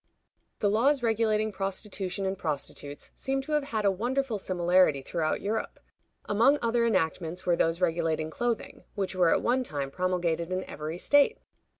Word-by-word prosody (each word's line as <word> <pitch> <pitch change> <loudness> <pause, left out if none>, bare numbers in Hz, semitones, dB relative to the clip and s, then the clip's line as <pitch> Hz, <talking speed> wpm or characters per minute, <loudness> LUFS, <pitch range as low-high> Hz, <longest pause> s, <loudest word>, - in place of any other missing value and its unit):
The 205 - +3
laws 260 +5 +3
regulating 220 -1 +1
prostitution 195 0 -3
and 190 0 -1
prostitutes 145 -3 -5
seem 270 0 -2
to 305 - -8
have 300 -2 +1
had 220 -6 -2
a 200 - +5
wonderful 240 +3 -1
similarity 180 -6 +2
throughout 155 +1 -1
Europe. 220 +2 -3 0.5
Among 235 +8 +4
other 235 0 +1
enactments 180 -3 -1
were 175 - +3
those 165 +1 0
regulating 160 -2 0
clothing, 240 +2 -3
which 195 -3 -2
were 180 -2 +3
at - - +2
one 255 +2 +2
time 140 - -4
promulgated 175 -1 -1
in 185 0 -1
every 155 +2 -6
state. 285 +9 +4
190 Hz, 160 wpm, -28 LUFS, 170-230 Hz, 0.5 s, a